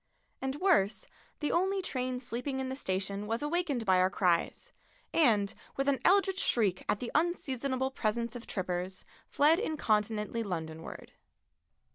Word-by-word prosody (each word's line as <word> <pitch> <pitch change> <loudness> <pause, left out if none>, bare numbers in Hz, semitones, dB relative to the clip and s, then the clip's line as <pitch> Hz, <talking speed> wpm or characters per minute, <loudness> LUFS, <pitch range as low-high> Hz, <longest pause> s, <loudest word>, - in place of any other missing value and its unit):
And 265 0 -2
worse, 305 - +2 0.4
the 295 - 0
only 385 +3 +2
train 255 -4 -2
sleeping 250 +2 -4
in 260 0 -2
the 260 - -3
station 200 -3 -3
was 230 +5 -1
awakened 295 -6 0
by 185 -2 +4
our 185 0 +4
cries, 180 -4 0 0.4
and, 215 -10 +3 0.2
with 275 +1 0
an 280 -2 +2
eldritch 385 0 +4
shriek 200 - +2
at 205 - +2
the 245 - -4
unseasonable 270 -5 0
presence 235 0 -1
of 245 - -8
trippers, 185 0 -3 0.2
fled 310 +4 +4
incontinently 220 - 0
Londonward. 160 -5 -6
245 Hz, 140 wpm, -31 LUFS, 200-290 Hz, 0.4 s, by